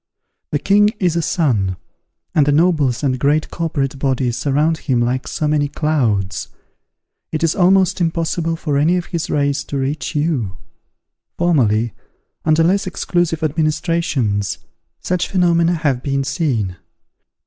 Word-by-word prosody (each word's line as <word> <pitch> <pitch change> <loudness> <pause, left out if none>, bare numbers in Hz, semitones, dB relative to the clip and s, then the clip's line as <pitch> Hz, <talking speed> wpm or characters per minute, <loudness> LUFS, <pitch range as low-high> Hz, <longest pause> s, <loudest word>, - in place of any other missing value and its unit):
The 145 - 0
king 205 +7 +4
is 175 -4 +1
a 170 - +1
sun, 115 - 0 0.6
and 150 -2 +3
the - - +4
nobles 150 -5 +2
and 130 -3 0
great 145 +3 +1
corporate 145 -5 -2
bodies 130 -3 0
surround 150 +4 +1
him 130 -4 0
like 125 +2 -1
so 155 - -2
many 150 -1 +1
clouds; 120 - -1 0.8
it 155 0 -2
is 165 - +3
almost 190 0 +3
impossible 165 0 0
for 150 -3 -1
any 165 +5 +3
of 175 - -3
his 170 -2 -4
rays 140 -1 0
to 140 - -4
reach 140 +4 -3
you. 145 - -1 0.8
Formerly, 120 -10 +2 0.5
under 155 +1 +3
less 190 +3 +2
exclusive 175 -3 -1
administrations, 155 - 0 0.4
such 180 -1 -1
phenomena 170 -2 +2
have 145 -6 0
been 140 0 -1
seen. 130 - -1
150 Hz, 135 wpm, -18 LUFS, 135-170 Hz, 0.8 s, king